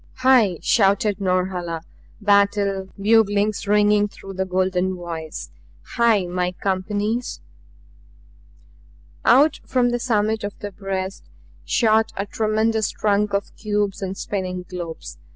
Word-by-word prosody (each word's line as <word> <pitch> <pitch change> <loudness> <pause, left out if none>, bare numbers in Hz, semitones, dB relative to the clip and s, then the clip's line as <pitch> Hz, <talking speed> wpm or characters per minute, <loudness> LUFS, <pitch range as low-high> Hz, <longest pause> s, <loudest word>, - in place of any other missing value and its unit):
"HAI!" 250 -8 +4
shouted 200 0 +2
Norhala, 180 -3 -1 0.4
battle 200 -2 +2
buglings 210 -1 +2
ringing 210 0 +4
through 195 -1 -11
the 190 0 -2
golden 185 0 0
voice. 165 -3 -7 0.4
"HAI! 230 -5 +3
my 180 0 -2
companies!" 205 +5 -2 1.8
Out 285 +5 +5
from 250 -1 +1
the 240 - -1
summit 220 -2 0
of 205 0 -5
the 205 - -6
breast 190 -1 -5 0.4
shot 220 -1 +2
a 200 - -1
tremendous 220 0 0
trunk 205 -1 0
of 200 - -3
cubes 205 -2 -2
and 190 0 -4
spinning 185 -2 -4
globes. 175 -3 -7
200 Hz, 115 wpm, -22 LUFS, 185-215 Hz, 1.8 s, Out